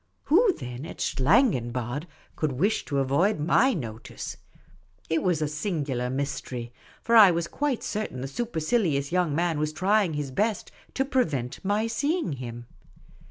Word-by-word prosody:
Who, 400 +8 +5
then, 125 - -7
at - - -10
Schlangenbad 130 - +1 0.3
could 155 -4 -1
wish 195 - 0
to 140 - -2
avoid 145 +9 +2
my 230 - +3
notice? 115 -8 -6 0.8
It 160 - +2
was 175 -5 +1
a - - 0
singular 145 -6 -2
mystery; 130 -3 -4 0.3
for 235 - +2
I 215 -4 +10
was 170 -1 0
quite 285 +1 -2
certain 210 - -3
the 135 - -3
supercilious 160 - 0
j'oung 175 -4 +1
man 170 -2 0
was 155 0 0
trying 190 +1 +2
his 145 -2 -3
best 210 - -1 0.2
to 270 - +1
prevent 155 - -1
my 205 +3 +1
seeing 285 - -1
him. 120 -2 -7
160 Hz, 150 wpm, -26 LUFS, 135-215 Hz, 0.8 s, I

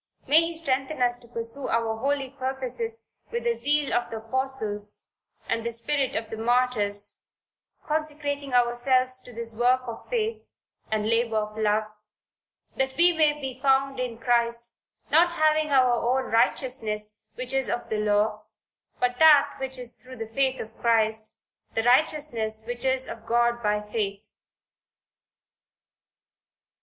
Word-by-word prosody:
May 310 +3 +6
he 335 0 -3
strengthen 275 -2 -2
us 245 0 +2
to 240 - -18
pursue 230 +3 -1
our 230 -1 0
holy 275 +1 -1
purposes 250 -4 -2 0.2
with 235 0 -3
the 235 0 +2
zeal 285 +5 0
of 240 - 0
the 225 - -5
Apostles 220 -3 -2 0.4
and 230 - -1
the 235 - -2
spirit 270 +3 -1
of 220 0 -3
the 225 - -5
Martyrs, 220 -4 +1 0.7
consecrating 295 -2 -2
ourselves 255 +1 +3
to 250 - -13
this 230 -1 -3
work 250 +3 +2
of 235 -2 -8
faith, 450 -2 -2 0.4
and 215 -1 0
labor 230 0 +1
of 210 0 -2
love, 215 0 +1 0.9
"that 265 0 -1
we 350 +1 +6
may 310 -2 +3
be 265 -2 -6
found 270 -1 +2
in 245 -2 -3
Christ, 235 0 0 0.4
not 340 +3 +5
having 310 -1 +2
our 260 -3 +4
own 245 +2 0
righteousness 225 -3 +1 0.2
which 255 +1 -3
is 270 -1 +1
of 240 - -3
the 215 - -1
law, 210 0 +1 0.5
but 250 0 0
that 305 -3 +6
which 265 -1 -2
is 245 -1 -3
through 255 +2 -11
the 225 -1 -8
faith 265 0 +1
of 220 0 -8
Christ 220 -1 +1 0.4
the 225 - +1
righteousness 245 -5 +2
which 240 +2 -3
is 260 0 +2
of 225 0 -9
God 235 0 +2
by 210 -1 +1
Faith." 210 -1 -4
245 Hz, 150 wpm, -26 LUFS, 225-270 Hz, 0.9 s, May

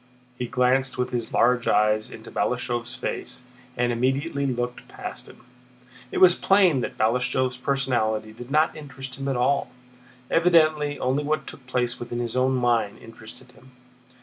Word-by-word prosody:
He 125 0 -4
glanced 130 +1 +1
with 125 0 -1
his 120 -2 -3
large 125 0 +2
eyes 105 0 +2
into - - -11
Balashëv's 120 0 -1
face 125 - -5 0.3
and 120 0 +1
immediately 140 +4 0
looked 125 -1 -3
past - - -8
him. - - -16 0.7
It - - -3
was 180 -2 +7
plain 185 -8 +3
that - - -5
Balashëv's 125 +3 +1
personality 120 -5 -1
did 120 +2 -10
not 155 +3 +2
interest 135 -3 -8
him 135 - -4
at 135 -2 0
all. 135 +3 +1 0.6
Evidently 155 -4 +3
only 130 +3 0
what 155 +1 -1
took 125 - -10
place 125 -1 -1
within 120 0 -5
his 120 -1 -3
own 130 +1 +2
mind 120 -4 +1
interested 115 +2 -12
him. 130 +1 -20
125 Hz, 155 wpm, -25 LUFS, 120-140 Hz, 0.7 s, was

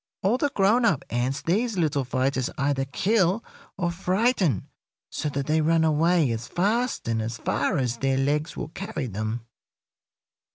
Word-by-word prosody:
All 220 +7 +2
the 290 - +2
grown 220 0 +3
up 170 - +2
ants 125 +5 -1
these 215 +5 0
little 150 -5 +1
fighters 130 0 0
either 140 -1 0
kill 190 - +1 0.3
or 175 -2 0
frighten 185 - +1 0.4
so 150 - -2
that 140 -1 -3
they 155 +2 +2
run 165 +1 +3
away 160 -2 +3
as 115 0 -4
fast 225 - 0
and 115 -1 0
as 115 +2 -4
far 185 - 0
as 125 -3 -1
their 135 +1 +1
legs 150 +4 0
will - - -4
carry 195 -4 -5
them. 110 +1 -4
155 Hz, 160 wpm, -25 LUFS, 130-190 Hz, 0.4 s, grown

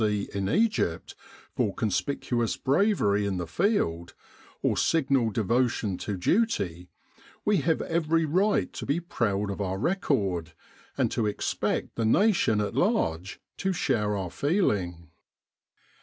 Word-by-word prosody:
C 105 -2 0
in 100 -1 -1
Egypt, 210 - 0 0.4
for 100 - 0
conspicuous 120 +2 -1
bravery 135 - +2
in 95 -2 -2
the 90 - -3
Field, 85 - 0 0.5
or - - +2
signal 135 -7 +2
devotion 110 -1 0
to 100 -2 -3
duty, 90 - 0 0.6
we 210 -1 +3
have 160 +1 +1
every 165 -1 +1
right 190 +7 +1
to - - -6
be 145 +5 +1
proud 105 - -1
of 100 - -5
our 95 -1 -2
record, 100 - -1 0.4
and - - +1
to 110 - 0
expect 105 - -2
the 115 - 0
nation 175 - +3
at 105 - -2
large 85 +4 0 0.2
to 190 -1 -1
share 105 - 0
our 90 -3 -4
feeling. 100 - -1
110 Hz, 130 wpm, -27 LUFS, -, 0.6 s, we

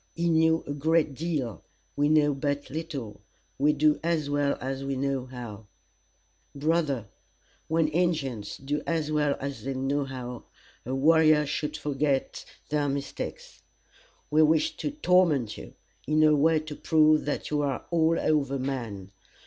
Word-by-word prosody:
He 170 0 0
knew 160 0 +3
a 145 - -4
great 155 +1 +1
deal. 135 - -3 0.3
We 145 +1 +2
know 150 -1 +4
but 145 0 -3
little. 145 -8 -6 0.4
We 145 +2 +4
do 150 0 +2
as 160 -4 0
well 145 -1 +1
as 135 +1 -4
we 135 0 -2
know 135 -1 -2
how. 115 -5 -9 0.9
"Brother, 145 -5 0 0.6
when 160 0 +2
Injins 150 - -1
do 145 +2 -3
as 160 -2 -1
well 150 -2 +1
as 135 -5 -5
they 135 +1 -3
know 135 +2 -1
how, 125 -2 -7 0.4
a 130 - -1
warrior 155 +1 +5
should 150 +1 -3
forget 140 -2 -1 0.2
their 145 -1 0
mistakes. 140 0 -5 0.7
We 155 +1 +5
wish 155 0 +3
to - - -2
torment 180 - +2
you, - - -11 0.3
in 155 +1 +3
a 155 -1 +6
way 155 +2 +3
to 155 -1 -8
prove 155 0 +3
that 145 - -3
you 150 -1 +1
are 140 -2 -2
all 165 -1 +3
over 140 -3 +1
man. 115 -8 -4
145 Hz, 150 wpm, -27 LUFS, 135-155 Hz, 0.9 s, a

